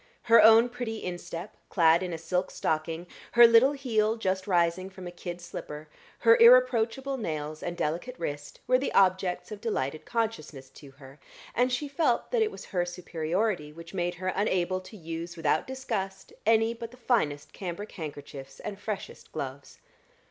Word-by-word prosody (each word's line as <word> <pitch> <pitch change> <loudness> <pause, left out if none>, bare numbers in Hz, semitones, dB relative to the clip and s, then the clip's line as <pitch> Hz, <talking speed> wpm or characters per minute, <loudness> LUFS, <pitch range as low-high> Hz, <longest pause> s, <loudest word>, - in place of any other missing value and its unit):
Her 230 -1 +7
own 225 +2 +8
pretty 240 -2 -5
instep, 175 +1 -6
clad 165 -1 +4
in 180 -1 -3
a 165 - -3
silk 180 +3 -1
stocking, 160 +2 -2 0.3
her 240 0 +9
little 230 +4 +6
heel, 225 -6 +1
just 190 -4 -2
rising 175 0 +1
from 190 -1 -11
a 175 - -6
kid 175 0 -7
slipper, 150 -3 -8 0.3
her 230 -1 +6
irreproachable 255 +2 +5
nails 155 - -4
and 175 0 -4
delicate 175 +13 -2
wrist, 145 -2 -6
were 255 0 +3
the 275 - -2
objects 185 0 +2
of 210 -1 -7
delighted 155 - -2
consciousness 180 - -3
to 140 - -14
her; 135 +1 -15 0.3
and 250 +1 +2
she 290 +4 -1
felt 280 -4 0
that 480 -2 +2
it 435 - +3
was - - -10
her 180 -2 -1
superiority 175 0 -2
which 165 +3 -12
made 175 -1 -1
her 185 +2 -3
unable 185 -2 0
to 200 +4 -12
use 165 0 -6
without 155 -1 +1
disgust 195 -8 -4
any 225 0 +4
but 230 0 -7
the 250 - -16
finest 210 - 0
cambric 190 +3 -6
handkerchiefs 145 -4 -8
and 205 -2 -6
freshest 210 -2 -6
gloves. 135 +1 -6
185 Hz, 170 wpm, -28 LUFS, 165-230 Hz, 0.3 s, her